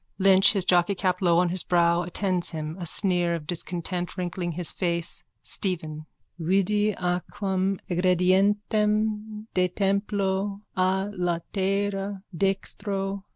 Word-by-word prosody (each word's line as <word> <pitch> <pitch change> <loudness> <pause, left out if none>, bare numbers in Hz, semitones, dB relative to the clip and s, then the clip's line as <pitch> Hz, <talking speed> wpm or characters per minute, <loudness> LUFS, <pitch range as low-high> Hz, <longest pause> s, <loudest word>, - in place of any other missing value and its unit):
Lynch, 190 0 +6
his 195 -3 +1
jockeycap 180 +1 +2
low 170 -2 +4
on 180 0 +3
his 180 +1 0
brow, 170 -1 +2
attends 180 0 0
him, 155 -1 -5
a 175 - +2
sneer 175 -2 +2
of 160 -3 -6
discontent 175 +2 -3
wrinkling 175 -1 -3
his 175 0 -1
face.)_ 170 -2 0 0.2
STEPHEN: 155 -5 -3 0.3
_Vidi 200 +4 +1
aquam 190 +2 -1
egredientem 210 +4 +1
de 180 -1 +3
templo 200 +1 -1
a 190 +2 +1
latere 195 +3 -2
dextro. 195 +1 -2
185 Hz, 110 wpm, -26 LUFS, 175-200 Hz, 0.3 s, Lynch